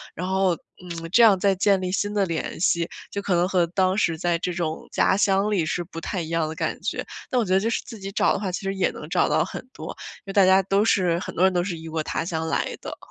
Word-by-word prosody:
然 180 - -4
后， 190 -1 +2 0.3
嗯， 165 -2 -7
这 235 - +5
样 210 -4 +7
再 195 +1 +3
建 195 0 +2
立 180 - -2
新 205 +2 -1
的 205 -2 +2
联 165 -3 -3
系， 170 -2 +2 0.2
就 200 - -3
可 190 -3 0
能 175 +1 +3
和 175 -3 +2
当 185 +2 +1
时 165 -5 +1
在 175 +1 +1
这 180 +1 -2
种 160 -2 -3
家 190 - +3
乡 200 +1 +2
里， 185 -6 +1
是 175 +2 -2
不 165 -1 -8
太 180 +2 -3
一 160 - -6
样 165 -1 0
的 160 - -6
感 - - -3
觉。 - - -3 0.2
但 255 - 0
我 - - +1
觉 185 - 0
得 190 - +5
就 225 +3 0
是 - - -1
自 225 -4 -9
己 195 0 -6
找 - - +3
的 - - 0
话， 195 -2 -2
其 185 - -3
实 195 0 -2
也 190 -2 +1
能 - - -9
找 - - +2
到 - - +2
很 255 - -7
多， - - -7 0.3
因 - - -38
为 195 - -5
大 195 -2 +6
家 190 +1 +5
都 195 +3 +2
是 175 -5 +2
很 - - -7
多 180 - +2
人 190 - +5
都 180 -1 +1
是 175 -2 -3
异 160 0 -8
国 160 0 -2
他 155 - -2
乡 160 -1 -3
来 - - -1
的。 - - -7
185 Hz, 310 characters per minute, -24 LUFS, 170-195 Hz, 0.3 s, 样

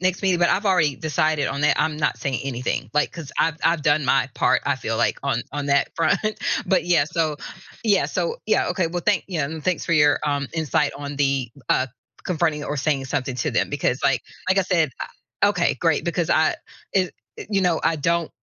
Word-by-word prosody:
"next 185 +1 0
meeting," 185 -3 +2
but 175 - +3
I've 205 +2 +1
already 155 -8 +3
decided 155 -1 0
on 140 +1 -3
that, 150 - +3
I'm 155 -1 0
not 150 - 0
saying 135 -4 -2
anything, 125 -2 -3
like, 150 0 +1
'cause 165 -4 -8
I've 165 -1 +2
I've 165 -3 +2
done 150 -1 +2
my 130 +1 +2
part - - +2
I - - +1
feel - - -3
like, - - +1
on - - 0
on 145 -1 -3
that 140 0 +2
front. 165 -1 +2 0.5
But 190 -1 +2
yeah, 170 -5 +3
so 155 -2 -1 0.5
yeah, 210 -3 +3
so 475 0 -2
yeah, - - +2
okay, 185 -4 0
well, 175 +1 -4
thank 205 -4 +2
y 175 -4 -3
um, 155 +2 -2
thanks 180 +1 -1
for 170 - -1
your, 150 -2 +4
um, 145 -1 0
insight 150 -2 0
on 145 0 -6
the, 135 -4 0 0.2
uh, 130 - +2 0.4
confronting 160 -4 0
or 150 - -3
saying 140 -1 0
something 130 -2 -2
to 120 - -1
them - - 0
because 140 -2 0
like 135 -4 +2 0.3
like 190 +1 +3
I - - +4
said, 170 -6 +1
I - - -2
okay, - - +1
great, - - +2
because - - -1
I - - +3 0.4
it 185 -3 +1 0.2
it - - -9
you 195 -2 +2
know, 175 -3 +2
I 165 - +2
don't 165 +2 0
155 Hz, 220 wpm, -23 LUFS, 140-175 Hz, 0.5 s, your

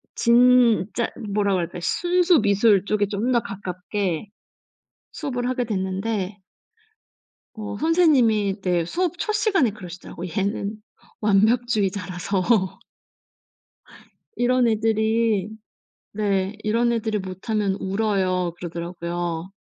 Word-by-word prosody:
진짜 235 -2 +4 0.2
뭐라 200 -1 +1
그럴까 175 -1 -2
순수 350 - +2
미술 205 -1 +3
쪽에 205 0 +1
좀 210 +5 -1
더 240 - +4
가깝게 190 -2 -4 0.9
수업을 245 -4 -3
하게 255 -1 -1
됐는데 195 0 -2 1.2
어 215 -2 -6
선생님이 235 - +3
네 175 -3 +1
수업 355 - -2
첫 430 - -1
시간에 395 - +2
그러시더라고. 180 -3 -9
얘는 200 +4 -2 0.5
완벽주의자라서 205 -4 +1 2.0
이런 250 0 +2
애들이 220 -2 +1 0.6
네. 200 -1 -1
"이런 230 +3 +2
애들이 220 -2 -1
못하면 195 +2 -2
울어요." 190 -3 0
그러더라고요. 170 0 -4
210 Hz, 230 characters per minute, -23 LUFS, 190-235 Hz, 2.0 s, 진짜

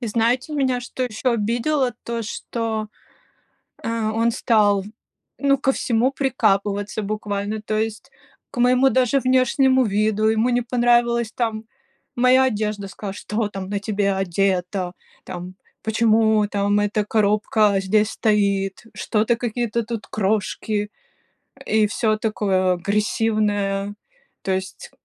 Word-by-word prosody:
И 240 - -4
знаете, 235 +6 0
меня 260 -3 +1
что 255 +1 -4
еще 245 +1 -1
обидело? 240 +4 0
То, 235 -1 -3
что, 220 0 -4 1.0
а, 230 -1 -1
он 230 +1 +2
стал, 210 -4 +2 0.6
ну 280 -1 +3
ко 270 0 +1
всему 245 0 +1
прикапываться 210 -6 0
буквально, 210 0 -3
то 215 0 -2
есть 220 0 -3 0.4
к - - -11
моему 250 +2 +4
даже 260 +2 +2
внешнему 260 +1 +3
виду, 215 +1 +1
ему 220 +2 +2
не 245 0 +2
понравилась 240 -1 +2
там 225 -3 -2 0.5
моя 255 +2 +5
одежда, 210 -4 -2
сказал: 195 0 -7
"Что 210 +1 -3
там 195 -2 -6
на 205 0 -1
тебе 200 -1 0
одето? 185 -1 -1 0.3
Там 180 +1 -8 0.3
почему 220 -1 +3
там 205 0 +1
эта 205 +1 0
коробка 210 -1 +2
здесь 210 +3 +2
стоит? 200 -3 0
Что-то 225 +2 0
какие-то 235 -1 -2
тут 225 -1 -5
крошки?" 210 0 -1 0.8
И 215 -1 +3
всё 215 +1 0
такое 195 -4 +1
агрессивное. 205 +1 0 0.5
То 190 - -1
есть 190 0 -5
215 Hz, 125 wpm, -22 LUFS, 205-235 Hz, 1.0 s, моя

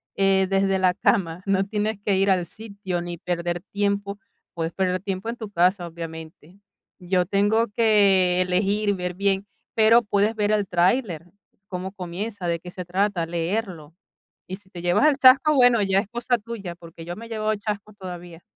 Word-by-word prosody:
eh, 195 -1 +3
desde 195 0 +1
la 185 -1 +2
cama, 180 -3 0
no 195 -1 +2
tienes 210 +1 -2
que 200 -2 +1
ir 195 0 +3
al 180 -2 +1
sitio, 200 -4 -6
ni 175 0 -6
perder 175 0 -3
tiempo, 200 0 -1 0.4
puedes 165 -1 -3
perder 185 -1 -1
tiempo 195 +2 -4
en 235 - -3
tu 215 -3 -8
casa, 180 +1 +2
obviamente. 165 +1 -10 0.4
Yo 180 0 0
tengo 205 +4 +2
que 200 -4 +3
elegir, 200 +3 +1
ver 180 -1 -4
bien, 195 +1 0 0.3
pero 225 +2 +6
puedes 210 +1 0
ver 210 -1 0
el 205 -2 +1
tráiler, 180 - +1 0.4
cómo 185 0 -5
comienza, 190 +1 -5
de 170 -1 -1
qué 180 +1 -10
se 180 0 -7
trata, 185 0 0
leerlo. 170 -2 -3 0.5
Y 185 - -6
si 195 -1 -26
te 175 -2 -9
llevas 175 +11 +3
el 290 -2 +3
chasco, 270 +3 +6
bueno, 245 -4 +5
ya 195 0 +2
es 195 - -3
cosa 240 +1 0
tuya, 210 -5 -7
porque 165 -1 -12
yo 175 +1 -5
me 230 +3 -10
he - - -18
llevado 215 -1 -1
chasco 210 0 -5
todavía. 175 -3 -9
195 Hz, 180 wpm, -24 LUFS, 175-210 Hz, 0.5 s, pero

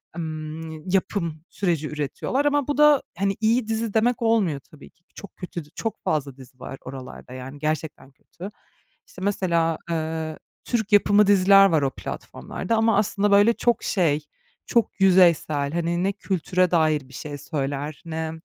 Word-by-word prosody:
emm, 160 0 -6
yapım 180 -4 -1
süreci 170 -6 -1
üretiyorlar 150 - -2
ama 290 -2 +1
bu 290 - -1
da, 300 -2 +6 0.2
hani, 195 +1 0
iyi 225 +1 +2
dizi 225 -1 -2
demek 235 +2 +2
olmuyor 215 -11 +2
tabii 145 +1 -16
ki. 170 - -39
Çok 200 - -11
kötü 175 -3 -7
dü - - -21
çok 225 -2 -4
fazla 140 -3 -1
dizi 130 -1 -15
var 135 - -7
oralarda, 130 -1 -9
yani, 130 +2 -8
gerçekten 155 -2 -3
kötü. 180 +8 -11 0.6
İşte, 185 - -13
mesela, 170 -5 +1
eee, 160 -1 -3 0.3
Türk 220 -3 -1
yapımı 205 0 +5
diziler 195 0 +6
var 160 -6 +3
o 135 - +1
platformlarda 190 - -5
ama 225 -1 +3
aslında 205 0 +1
böyle 205 +3 +6
çok 240 -1 0
şey, 165 -7 +1 0.5
çok 235 -3 0
yüzeysel, 170 -6 +4
hani, 170 +1 -1
ne 195 - +2
kültüre 185 -1 0
dair 155 -5 +2
bir - - -16
şey 145 +3 -6
söyler 145 0 -4
ne, 160 -1 -3
170 Hz, 160 wpm, -24 LUFS, 155-205 Hz, 0.6 s, da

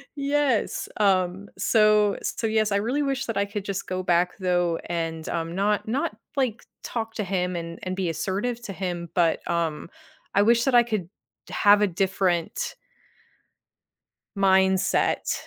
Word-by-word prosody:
Yes, 280 -4 0
um, 190 -1 +2
so 215 -2 +4
so, 225 - -2
yes, 215 -1 +1
I 200 - +3
really 250 +8 0
wish 270 -1 -1
that 230 -4 -3
I 200 - +2
could 200 0 -5
just 200 -1 -3
go 185 0 -2
back 180 +1 +1
though, 175 -2 +1
and, 165 -2 -3
um, 165 0 -3
not 205 +2 0
not, 280 +9 -1 0.2
like, 240 -4 0 0.2
talk 225 -1 -4
to 210 - -2
him 180 -1 -1
and 170 0 -5
and 185 0 -3
be 185 -3 -1
assertive 195 +9 -2
to 195 - -6
him, 175 -3 -4
but, 170 -2 +2
um, 165 -1 -1 0.5
I 200 - +5
wish 235 +1 +4
that 265 -2 +2
I 240 - +7
could 210 -7 -3 0.4
have 205 0 +5
a 205 - +4
different 185 -2 -1 1.6
mindset, 190 -1 +2
195 Hz, 155 wpm, -25 LUFS, 175-220 Hz, 1.6 s, I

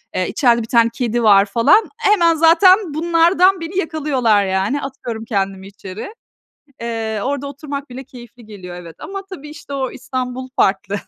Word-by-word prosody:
Eee, 185 - 0
içeride 235 -3 +2
1 220 - -6
tane 230 -1 +3
kedi 240 -1 -2
var 200 -2 +6
falan. 230 - +3
Hemen 350 -7 +3
zaten 340 +2 +4
bunlardan 345 +4 +3
beni 335 +3 -6
yakalıyorlar 275 - +1
yani. 190 +9 -1
Atıyorum 240 -4 -6
kendimi 195 -3 -3
içeri. 200 - -9 0.7
Eee, 225 -2 -3
orada 280 +1 -3
oturmak 280 0 -7
bile 260 +2 -8
keyifli 240 -2 -14
geliyor, 185 -4 -10
evet. 170 -2 -11
Ama 390 0 -6
tabii 300 -6 -9
işte, 290 -2 -10
o 265 -2 -2
İstanbul 255 0 -5
farklı. 195 +1 +1
255 Hz, 155 wpm, -18 LUFS, 220-315 Hz, 0.7 s, var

